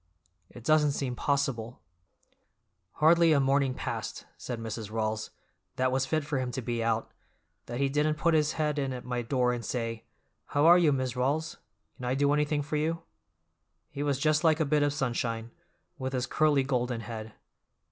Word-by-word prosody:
It 120 - -12
doesn't 150 0 +3
seem 130 -3 -2
possible—" 130 -4 -1 1.1
"Hardly 165 +1 +5
a 145 - +4
morning 135 -1 +2
passed," - - -5
said 120 -2 -6
Mrs. 110 -1 -5
Rawls, 110 0 -2 0.5
"that 130 0 +1
was 130 +1 0
fit 155 +1 0
for 145 -2 -1
him 130 -1 -2
to 130 - -3
be 120 0 -2
out, 115 0 0 0.6
that 120 - -4
he 140 - +2
didn't 150 +2 +1
put 170 +2 +2
his 155 -1 +2
head 150 -1 0
in 135 -2 -1
at 125 - -7
my 125 -1 -2
door 125 +1 +1
and 120 -1 -4
say, 115 -2 -3 0.4
'How 145 +1 +2
are 175 +2 +8
you, 165 -4 +4
Mis' 130 -2 -1
Rawls? 145 +6 -1 0.4
Can 125 - -7
I 125 +1 0
do 145 +1 +3
anything 150 0 +1
for 150 +1 -2
you?' 165 +2 -1 0.9
He 140 - -5
was 145 -2 +1
just 155 +3 +2
like 160 -1 +4
a 160 - +2
bit 150 +1 +2
of 145 0 +2
sunshine, 120 -4 -2 0.5
with 130 0 -3
his 125 -1 0
curly 150 -1 +2
golden 125 -3 -1
head. 110 -1 -7
135 Hz, 185 wpm, -29 LUFS, 120-150 Hz, 1.1 s, are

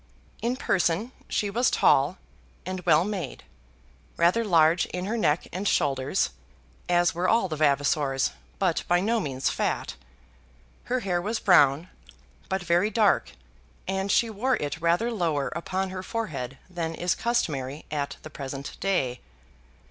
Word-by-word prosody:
In 240 +2 0
person 195 -1 0 0.2
she 205 -1 -1
was 240 +5 +2
tall - - +3 0.5
and 185 0 -4
well 160 0 +5
made, 195 -9 -5 0.7
rather 175 +7 +3
large 170 -4 +4
in 180 +1 -4
her 215 +4 -2
neck 165 -8 +1
and 195 +3 -2
shoulders, 135 - +1 0.6
as 175 -1 +3
were 175 +2 0
all 225 -4 +3
the 160 - -4
Vavasors, 140 - +1 0.3
but - - +1
by 175 0 +3
no 225 +5 +1
means 135 -7 -1
fat. - - -2 0.9
Her 255 0 -1
hair 180 -4 0
was 215 +4 -2
brown, 160 -3 +4 0.6
but 190 -1 -1
very 175 +4 +2
dark, 215 -3 +2 0.5
and 190 +1 -1
she 235 - +3
wore 235 +4 0
it 150 +2 -4
rather 175 +8 +2
lower 165 -10 0
upon 185 +3 -3
her 185 0 -5
forehead 150 - -4
than 170 -3 -4
is 175 +2 0
customary 145 - -2
at 145 -2 -3
the 155 - -9
present 140 -1 -7
day. 135 -11 0
175 Hz, 145 wpm, -26 LUFS, 150-200 Hz, 0.9 s, well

